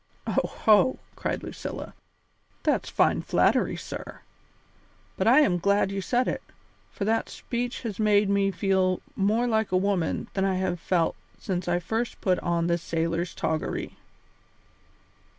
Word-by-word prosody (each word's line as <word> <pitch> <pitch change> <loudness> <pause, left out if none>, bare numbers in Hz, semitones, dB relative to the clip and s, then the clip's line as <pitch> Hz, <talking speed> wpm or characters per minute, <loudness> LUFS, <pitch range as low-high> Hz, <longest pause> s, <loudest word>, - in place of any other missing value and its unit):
"Oho!" 215 +3 +3 0.2
cried - - -3
Lucilla, - - -6 0.7
"that's - - +1
fine - - +2
flattery, - - +2
sir; - - -8 0.9
but - - 0
I 260 +6 +7
am 180 -10 +2
glad 200 +1 +2
you 195 0 -2
said 245 +6 +1
it, - - -2 0.5
for 200 - -4
that 225 +2 +1
speech 245 +1 -4
has 220 -4 -4
made 210 -1 +4
me 200 0 +2
feel 190 -1 +1 0.2
more 215 +5 +2
like 220 -4 +1
a 185 - +3
woman 185 -3 0
than 190 - 0
I 195 -1 +1
have 185 -2 -1
felt 170 -1 +1 0.2
since 185 -2 -3
I 175 0 +2
first 225 +7 -3
put 185 -2 +1
on 170 -1 0
this 170 0 +1
sailor's 165 +1 -2
toggery." 160 -1 -2
195 Hz, 145 wpm, -26 LUFS, 175-215 Hz, 0.9 s, I